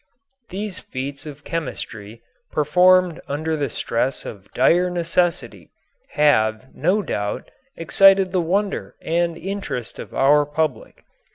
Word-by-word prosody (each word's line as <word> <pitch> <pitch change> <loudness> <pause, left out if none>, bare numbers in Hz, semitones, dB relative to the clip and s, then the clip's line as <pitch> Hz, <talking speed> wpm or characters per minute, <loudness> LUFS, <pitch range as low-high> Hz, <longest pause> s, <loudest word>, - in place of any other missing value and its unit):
These 195 0 -4
feats 140 +3 -6
of 145 0 -10
chemistry, 115 -9 -6 0.3
performed 180 +3 +3
under 155 +3 -2
the 145 -3 -2
stress 120 +4 -2
of 100 -1 -10
dire 180 +1 +3
necessity, 165 - -1 0.4
have, 110 -5 +2
no 185 +8 +1
doubt, 105 - -4 0.3
excited 195 +3 +5
the 185 -1 +1
wonder 195 +4 -1
and 170 0 0
interest 190 - -5
of - - -8
our 145 +2 +4
public. 150 -4 -3
160 Hz, 115 wpm, -21 LUFS, 130-180 Hz, 0.4 s, excited